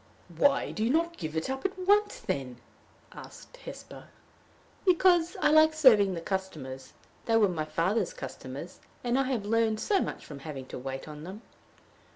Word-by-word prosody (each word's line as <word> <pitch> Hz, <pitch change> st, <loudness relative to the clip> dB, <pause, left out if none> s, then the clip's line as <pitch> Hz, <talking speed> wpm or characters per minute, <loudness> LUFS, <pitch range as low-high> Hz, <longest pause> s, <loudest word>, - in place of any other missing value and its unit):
"Why 280 Hz, -, +2 dB
do 215 Hz, -, -3 dB
you 225 Hz, -, +1 dB
not 335 Hz, +4 st, +1 dB
give 160 Hz, -1 st, -4 dB
it 160 Hz, -, -1 dB
up 265 Hz, 0 st, -4 dB
at 390 Hz, 0 st, -2 dB
once 410 Hz, +3 st, +2 dB
then?" 130 Hz, -3 st, -3 dB, 0.5 s
asked -, -, -12 dB
Hesper. -, -, -10 dB, 0.8 s
"Because 355 Hz, -2 st, +3 dB
I 295 Hz, -, +3 dB
like 310 Hz, 0 st, +6 dB
serving 215 Hz, -11 st, +5 dB
the 165 Hz, -, -5 dB
customers. 155 Hz, -9 st, -5 dB, 0.3 s
They 225 Hz, -1 st, +3 dB
were 215 Hz, -2 st, +5 dB
my 160 Hz, -4 st, -2 dB
father's 185 Hz, -, 0 dB
customers; -, -, -8 dB, 0.2 s
and 245 Hz, +2 st, +1 dB
I 270 Hz, -, +2 dB
have 250 Hz, -6 st, -2 dB
learned 220 Hz, 0 st, +1 dB
so 400 Hz, -, +2 dB
much -, -, -5 dB
from 145 Hz, -2 st, -9 dB
having 140 Hz, -3 st, -7 dB
to -, -, -6 dB
wait 135 Hz, +2 st, -6 dB
on 150 Hz, 0 st, -9 dB
them!" 195 Hz, +6 st, -9 dB
220 Hz, 175 wpm, -29 LUFS, -, 0.8 s, like